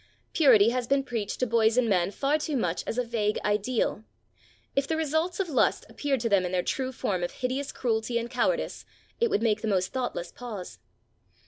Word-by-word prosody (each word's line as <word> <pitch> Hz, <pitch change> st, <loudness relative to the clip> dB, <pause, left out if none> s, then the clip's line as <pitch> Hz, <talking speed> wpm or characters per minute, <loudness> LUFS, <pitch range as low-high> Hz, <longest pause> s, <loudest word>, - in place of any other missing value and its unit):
Purity 235 Hz, -, +6 dB
has 245 Hz, 0 st, -1 dB
been 275 Hz, +1 st, +2 dB
preached 230 Hz, -6 st, -4 dB
to -, -, +4 dB
boys 230 Hz, 0 st, +3 dB
and 250 Hz, -2 st, +3 dB
men 180 Hz, -4 st, +2 dB
far 280 Hz, +8 st, 0 dB
too 300 Hz, -2 st, -2 dB
much 180 Hz, -7 st, -1 dB
as 225 Hz, -, -3 dB
a 250 Hz, -, +2 dB
vague 220 Hz, -3 st, -1 dB
ideal. 210 Hz, +1 st, 0 dB, 0.7 s
If 275 Hz, 0 st, +1 dB
the 320 Hz, -, 0 dB
results 320 Hz, +4 st, 0 dB
of 385 Hz, -, 0 dB
lust 295 Hz, -, +1 dB
appeared 275 Hz, -4 st, -1 dB
to 235 Hz, -, 0 dB
them 200 Hz, -3 st, +4 dB
in 180 Hz, -, -2 dB
their 180 Hz, -1 st, +1 dB
true 260 Hz, -1 st, -2 dB
form 190 Hz, -7 st, -2 dB
of 175 Hz, -, -1 dB
hideous 260 Hz, +2 st, -2 dB
cruelty 230 Hz, -1 st, -1 dB
and 235 Hz, 0 st, -2 dB
cowardice, 380 Hz, -, -1 dB, 0.4 s
it 470 Hz, 0 st, +3 dB
would 225 Hz, -, +1 dB
make 215 Hz, -2 st, +2 dB
the 225 Hz, -, -2 dB
most 185 Hz, -3 st, 0 dB
thoughtless 245 Hz, -9 st, -3 dB
pause. 220 Hz, -7 st, -8 dB
235 Hz, 205 wpm, -27 LUFS, 210-275 Hz, 0.7 s, Purity